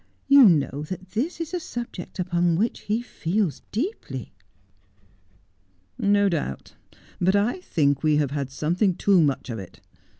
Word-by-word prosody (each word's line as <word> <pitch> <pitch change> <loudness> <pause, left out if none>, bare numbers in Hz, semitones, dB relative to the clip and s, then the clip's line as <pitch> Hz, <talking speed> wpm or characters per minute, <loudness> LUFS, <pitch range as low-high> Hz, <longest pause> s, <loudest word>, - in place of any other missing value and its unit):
'You 275 -6 +8
know 145 -3 +1
that 185 0 -7
this 280 - -2
is 330 +1 -5
a 360 - 0
subject 240 - -7
upon 175 -2 +1
which 220 +7 0
he 220 +3 -2
feels 185 -6 -2
deeply.' 220 - -4 0.9
' 95 0 -39 0.2
No 200 0 +4
doubt. 150 - -3 0.5
But 190 +2 +3
I 215 - +1
think 140 - +1
we 155 -1 +3
have 145 -2 +1
had 140 -2 -3
something 175 +7 0
too 190 -1 +4
much 140 -4 0
of 115 - -4
it. 95 -2 -11
175 Hz, 155 wpm, -24 LUFS, 140-215 Hz, 0.9 s, You